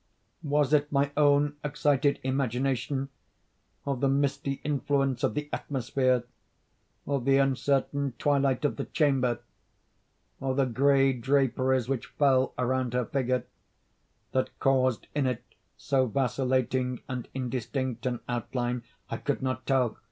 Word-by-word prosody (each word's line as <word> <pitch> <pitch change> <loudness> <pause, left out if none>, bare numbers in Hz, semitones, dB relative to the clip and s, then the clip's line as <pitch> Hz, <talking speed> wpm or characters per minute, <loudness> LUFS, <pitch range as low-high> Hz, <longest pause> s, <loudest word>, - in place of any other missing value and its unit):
Was 145 -1 +1
it 150 0 +3
my 140 0 +2
own 145 0 +3
excited 145 -1 +1
imagination—or 135 +1 -3
the 135 +2 +1
misty 140 0 0
influence 140 -2 0
of 135 - +1
the 150 0 -2
atmosphere—or 130 +1 -3
the 135 +2 +3
uncertain 135 0 +1
twilight 140 -1 +1
of 145 - 0
the - - -3
chamber—or 130 -1 -3
the 135 0 +3
gray 135 +2 +3
draperies 130 -1 +1
which 135 -3 -2
fell 135 -3 +2
around 125 -1 0
her 125 -1 +1
figure—that 130 0 -4
caused 130 -3 +2
in 145 -2 +1
it 125 -3 -2 0.3
so 130 -2 +1
vacillating 130 0 0
and 125 -2 -4
indistinct 130 -1 -3
an 120 -2 -2
outline? 120 +1 -2 0.3
I 115 - -1
could 145 +1 -2
not 130 -1 -2
tell. 130 -5 +2
135 Hz, 115 wpm, -28 LUFS, 125-140 Hz, 0.3 s, it